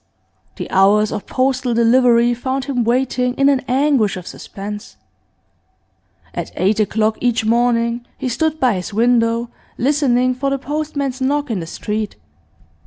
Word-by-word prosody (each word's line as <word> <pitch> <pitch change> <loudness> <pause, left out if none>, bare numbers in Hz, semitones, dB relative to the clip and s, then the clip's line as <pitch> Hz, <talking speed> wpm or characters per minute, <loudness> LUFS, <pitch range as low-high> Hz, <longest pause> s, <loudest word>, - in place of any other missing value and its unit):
The - - -6
hours 205 +3 +4
of 210 - -5
postal 255 -2 0
delivery 235 0 +4
found 260 +2 -3
him 260 -4 -1
waiting 250 +1 0
in 275 0 +3
an 275 -2 +3
anguish 260 -6 +2
of 180 - -8
suspense. 205 +3 -8 1.4
At - - -5
eight 200 +4 +1
o'clock 215 +1 +1
each 240 -3 +1
morning 235 +1 +1
he - - -3
stood 315 +5 -1
by 255 -3 +3
his 190 +2 -5
window, 230 0 +2 0.3
listening 255 -2 +2
for 270 +2 -2
the 275 - 0
postman's 285 -2 -3
knock 285 0 0
in 210 - -1
the 165 - -6
street. 210 +4 -4
245 Hz, 145 wpm, -18 LUFS, 220-265 Hz, 1.4 s, hours